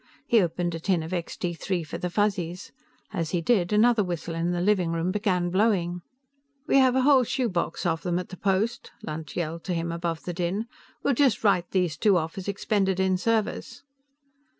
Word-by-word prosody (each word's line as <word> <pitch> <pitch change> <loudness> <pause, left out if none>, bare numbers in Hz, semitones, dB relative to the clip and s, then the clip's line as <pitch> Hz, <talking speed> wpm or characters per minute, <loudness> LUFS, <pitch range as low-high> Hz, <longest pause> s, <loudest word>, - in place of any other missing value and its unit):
He 230 -3 +4
opened 175 0 -1
a 165 - -4
tin 175 -1 0
of 160 +3 -6
Extee 175 0 -3
Three 175 +1 -2
for 155 - -6
the 180 - -2
Fuzzies, 180 -3 -1 0.4
as 165 -5 -2
he 175 - 0
did, 175 0 +1
another 220 +1 +4
whistle 175 -2 -4
in 165 +1 -1
the 175 0 -1
living 185 -2 +2
room 165 +2 -1
began 185 -4 0
blowing. 180 -3 +1 0.6
"We 285 - +3
have 260 -1 +4
a 260 - +3
whole 270 -2 +6
shoebox 240 -8 -1
full 175 - +2
of 160 0 -3
them 175 0 -1
at 180 - -4
the 185 - -9
post," 200 +5 0
Lunt 155 -1 -6
yelled 165 -1 -3
to 180 - -1
him 165 0 -2
above 170 -1 -3
the 175 - -4
din. 180 +5 -2 0.4
"We'll 280 - +2
just 255 -4 +2
write 180 -4 +2
these 180 -4 0
two 200 -1 +4
off 160 -1 -3
as 190 - -8
expended 195 -1 0
in 190 0 +2
service." 225 +3 -1
180 Hz, 200 wpm, -26 LUFS, 170-210 Hz, 0.6 s, whole